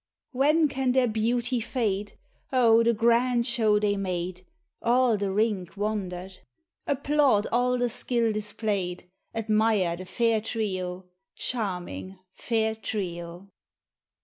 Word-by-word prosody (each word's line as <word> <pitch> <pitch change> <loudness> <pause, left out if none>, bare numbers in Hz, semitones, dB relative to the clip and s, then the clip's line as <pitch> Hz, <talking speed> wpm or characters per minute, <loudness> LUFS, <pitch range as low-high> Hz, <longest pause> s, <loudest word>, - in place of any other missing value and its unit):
" - - -62
When 300 +5 +3
can 265 -2 0
their 260 -1 +3
beauty 235 +3 0
fade 210 -4 -2 0.2
?" - - -40
Oh! 230 -3 +5
the 230 0 +4
grand 235 +2 +2
show 225 -4 +3
they 205 -1 +1
made, 180 -1 -3 0.4
All 245 0 +3
the 200 -1 -1
rink 200 -3 -1
wonder'd; 190 -3 -3 0.5
Applaud 280 -6 +2
all 250 +1 +2
the 245 0 +1
skill 235 -1 0
displayed, 205 -4 -3 0.3
Admire 215 -5 +2
the 185 - -8
fair 230 +2 +1
trio. 185 -5 -3 0.3
Charming 190 -4 -4 0.2
fair 220 -2 0
trio. 180 -4 -5
220 Hz, 120 wpm, -27 LUFS, 195-240 Hz, 0.5 s, Oh